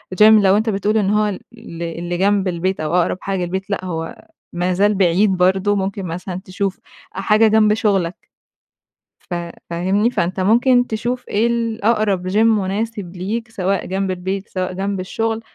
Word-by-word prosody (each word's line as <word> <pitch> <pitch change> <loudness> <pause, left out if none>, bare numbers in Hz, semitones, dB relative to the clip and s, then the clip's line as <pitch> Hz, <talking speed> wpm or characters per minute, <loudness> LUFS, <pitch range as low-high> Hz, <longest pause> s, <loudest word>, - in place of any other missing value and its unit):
gym 210 - +5
لو 210 -2 +6
أنت 220 +2 0
بتقول 210 +1 0
إن 200 -3 +1
هو 210 +1 +2
ال 200 -3 -4
اللي 170 -7 -7
اللي 175 0 -3
جنب 200 0 +2
البيت 185 +2 -1
أو 155 +2 -2
أقرب 180 0 +1
حاجة 195 -1 -2
للبيت 190 +3 -4
لأ، 200 -2 -2
هو 165 -2 -5 0.3
ما 180 +1 0
زال 205 +3 +2
بعيد 190 +1 +3
برضه. 190 +3 +2
ممكن 195 -1 -2
مثلًا 180 +2 -5
تشوف 190 0 -3 0.4
أ - - -4
حاجة 215 +2 +4
جنب 215 -1 +4
شغلك. 195 -5 0 1.0
ف - - -9 0.4
فاهمني؟ 190 +6 +1
فأنت 180 -1 -1
ممكن 245 +5 +3
تشوف 240 +3 -3
إيه 220 +3 +2
الأقرب 220 -4 0
gym 190 - -3
مناسب 210 -3 0
ليك 220 +6 -4
سواء 195 -2 -1
جنب 190 0 -2
البيت، 190 +2 -4
سواء 185 -1 -3
جنب 195 +1 -3
الشغل. 225 +4 -2
195 Hz, 170 wpm, -19 LUFS, 185-215 Hz, 1.0 s, لو